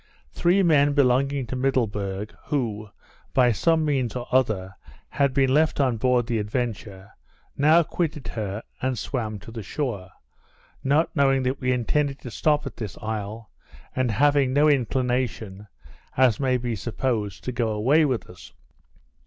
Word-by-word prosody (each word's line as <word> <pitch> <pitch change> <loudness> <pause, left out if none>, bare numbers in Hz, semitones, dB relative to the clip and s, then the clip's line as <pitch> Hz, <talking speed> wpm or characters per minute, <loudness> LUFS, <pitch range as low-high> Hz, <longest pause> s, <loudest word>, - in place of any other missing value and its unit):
Three 180 - +2
men 145 -4 +4
belonging 135 0 +2
to 125 - -5
Middleburg, 105 -6 -1
who, 110 -7 -2 0.5
by 125 -2 +5
some 160 +7 +2
means 130 -6 0
or 125 -1 -4
other, 105 -8 +1 0.3
had 140 -1 +1
been 135 -1 +2
left 155 +1 +2
on 130 -4 +2
board 125 +1 +2
the 115 -2 -1
Adventure, 105 -3 -4 0.4
now 155 +4 +5
quitted 155 -3 -3
her, 105 -1 -4 0.2
and 130 -1 -1
swam 110 -6 -3
to 105 +3 -12
the 115 0 -6
shore; 105 -6 -4 0.7
not 150 +6 +1
knowing 135 -2 +3
that 130 +2 -1
we 125 0 +1
intended 135 +3 0
to 125 - -8
stop 150 +5 +1
at - - -7
this 105 -5 -6
isle, 110 0 -5 0.4
and 130 -1 +1
having 140 +2 +3
no 145 +2 +4
inclination, 125 -6 -1 0.5
as 125 -4 +4
may 130 -2 +2
be 120 -2 -3
supposed, 110 -1 -3
to 125 - -3
go 120 -1 -1
away 125 +9 +3
with 130 -6 -1
us. 90 - -14
125 Hz, 155 wpm, -24 LUFS, 110-140 Hz, 0.7 s, by